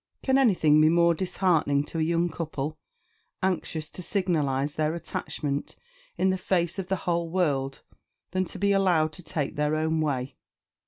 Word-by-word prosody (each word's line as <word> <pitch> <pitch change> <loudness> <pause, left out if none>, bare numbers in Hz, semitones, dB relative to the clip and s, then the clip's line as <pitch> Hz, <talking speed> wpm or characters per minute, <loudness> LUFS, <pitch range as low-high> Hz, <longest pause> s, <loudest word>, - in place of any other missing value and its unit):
Can 265 0 +3
anything 160 - +4
be 155 - +6
more 170 +1 +4
disheartening 170 -5 +1
to 165 - -5
a - - +1
young 170 +2 +2
couple, 155 -3 -4 0.7
anxious 165 -4 -1
to - - -8
signalise 150 -8 0
their 155 +1 0
attachment 145 -3 -4 0.4
in 190 - +3
the 185 - -2
face 180 0 0
of 185 - -4
the 190 - +1
whole 170 -1 0
world, 140 -7 -1 0.5
than 185 +1 0
to - - -7
be 200 0 +2
allowed 175 -6 +3
to 180 - -7
take 155 -4 -3
their 150 +1 +1
own 160 0 0
way? 135 -4 -2
165 Hz, 165 wpm, -27 LUFS, 150-185 Hz, 0.7 s, be